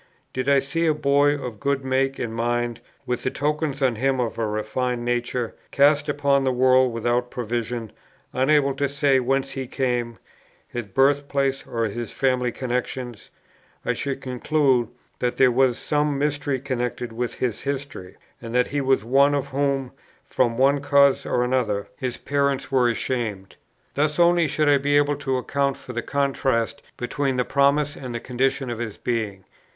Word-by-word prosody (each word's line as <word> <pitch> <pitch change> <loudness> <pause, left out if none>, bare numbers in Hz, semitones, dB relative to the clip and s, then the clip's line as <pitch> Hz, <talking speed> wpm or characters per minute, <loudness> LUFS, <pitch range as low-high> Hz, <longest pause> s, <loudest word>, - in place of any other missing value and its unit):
Did 130 +2 -1
I 140 - +5
see 140 +5 0
a 155 - +3
boy 145 0 +3
of 125 -6 -7
good 140 +1 -1
make 135 +1 +1
and 115 -2 -4
mind, 120 0 -1 0.2
with 125 -1 -2
the - - 0
tokens 150 0 -1
on 125 -4 +2
him 135 +2 +1
of 120 -2 -2
a 115 - 0
refined 120 +3 -2
nature, 120 -1 -1 0.2
cast 145 +1 +3
upon 140 -1 +2
the 130 - +2
world 130 0 +4
without 120 +2 0
provision, 120 -1 -3 0.4
unable 140 +1 +3
to 140 0 0
say 140 -1 +2
whence 135 +2 0
he 135 -1 -5
came, 120 -3 -1 0.5
his 120 -2 -5
birth 140 +7 +2
place 135 -1 -1
or 115 -1 -2
his 115 +2 -4
family 125 -2 +1
connexions, 125 -2 -4 0.6
I - - +1
should 140 -1 -4
conclude 130 -1 +1 0.3
that 125 0 -1
there 130 -1 +5
was 125 -1 +3
some 150 -1 0
mystery 145 -1 -1
connected 125 -3 -3
with 120 0 -3
his 120 -4 -2
history, 140 -8 -5 0.3
and 115 0 -6
that 125 - +3
he 145 0 -1
was 135 -5 +1
one, 140 +4 +4
of 140 -1 -2
whom, 135 -1 -1 0.3
from 120 -2 0
one 140 +2 +3
cause 140 -1 +4
or 125 - +1
other, 105 -6 0
his 125 -2 -4
parents 140 -1 -1
were 125 -2 +3
ashamed. 110 -5 -3 0.4
Thus 150 +1 0
only 175 -1 +4
should 155 0 0
I 145 -1 +5
be 145 +1 +2
able 145 0 +2
to 135 -3 -1
account 140 +1 -1
for 125 - -9
the 120 - -2
contrast 135 -4 0 0.2
between 130 +2 -1
the 125 - +1
promise 140 +1 +2
and 125 -3 -7
the - - -2
condition 130 +1 -1
of 115 - -5
his 115 -3 -5
being. 110 -5 -3
130 Hz, 175 wpm, -23 LUFS, 120-140 Hz, 0.6 s, I